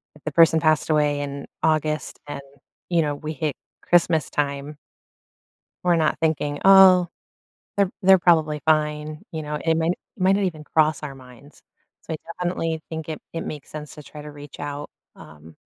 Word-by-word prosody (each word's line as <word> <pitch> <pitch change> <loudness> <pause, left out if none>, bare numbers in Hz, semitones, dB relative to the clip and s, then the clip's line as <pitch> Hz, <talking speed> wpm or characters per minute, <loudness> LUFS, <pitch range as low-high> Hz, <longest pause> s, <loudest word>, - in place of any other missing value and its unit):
if 150 - -19
the 155 - -3
person 160 +1 +5
passed 155 -1 +2
away 150 -2 +2
in 140 -1 -5 0.2
August 155 -1 0
and, 145 - -6 0.5
you 170 -2 +3
know, 145 -2 -1
we 155 +2 -6
hit 150 -1 -2 0.3
Christmastime 150 -4 +1 1.1
we're 175 -1 +4
not 160 -2 +1
thinking, 150 -2 0
"Oh, 190 -2 +8 0.7
they're 200 -2 +2
they're 190 -1 +6
probably 160 -4 +3
fine," 150 -1 0
you 160 - -4
know, 150 0 -4
it 165 -1 +2
might 160 0 0
n - - +3 0.3
it - - -9
might 190 +1 +5
not 200 - 0
even 160 -4 -4
cross 155 0 +1
our 140 -2 -6
minds, 130 +2 -16 0.4
so - - -6
I - - -4 0.2
definitely 165 -2 -2
think 160 -1 -6
it 155 - -5
it 165 - -3
makes 150 -2 -7
sense 150 -1 -8
to 150 - -11
try 150 +1 -11
to 150 - -9
reach 145 0 -12
out, 145 0 -5 0.3
um, 75 +1 -14
155 Hz, 180 wpm, -23 LUFS, 145-165 Hz, 1.1 s, Oh